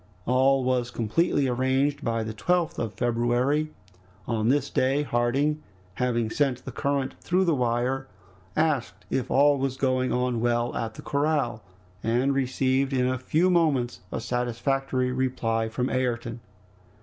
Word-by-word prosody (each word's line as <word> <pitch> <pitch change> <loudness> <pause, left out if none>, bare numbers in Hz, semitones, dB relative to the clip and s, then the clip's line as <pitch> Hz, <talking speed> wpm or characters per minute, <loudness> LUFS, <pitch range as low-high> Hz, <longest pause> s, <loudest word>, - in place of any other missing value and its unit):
All 130 +2 +3
was 125 -1 0
completely 135 - +1
arranged 130 +3 +1
by 115 -1 0
the 110 0 -5
12th 175 +9 0
of 110 -2 -3
February. 120 +6 +1 0.6
On 115 -1 0
this 140 +1 +1
day, 135 +3 +2
Harding, 140 +4 0 0.3
having 120 -1 0
sent 130 -3 0
the - - -5
current 140 -2 -1
through 185 +2 +1
the 170 - +3
wire, 125 +1 0 0.5
asked 155 -5 0
if 130 - -1
all 140 +1 +4
was 135 -1 -1
going 130 -1 +1
on 125 -2 0
well 120 0 0
at 110 -1 -3
the - - -10
corral, 140 -6 0 0.4
and 125 +5 +1
received 135 0 +1
in 125 -1 +2
a 130 0 -1
few 165 +8 +2
moments 145 -8 +1
a - - -2
satisfactory 125 +2 -1
reply 125 -3 -1
from 125 +3 -1
Ayrton. 120 -2 -2
130 Hz, 145 wpm, -26 LUFS, 120-140 Hz, 0.6 s, all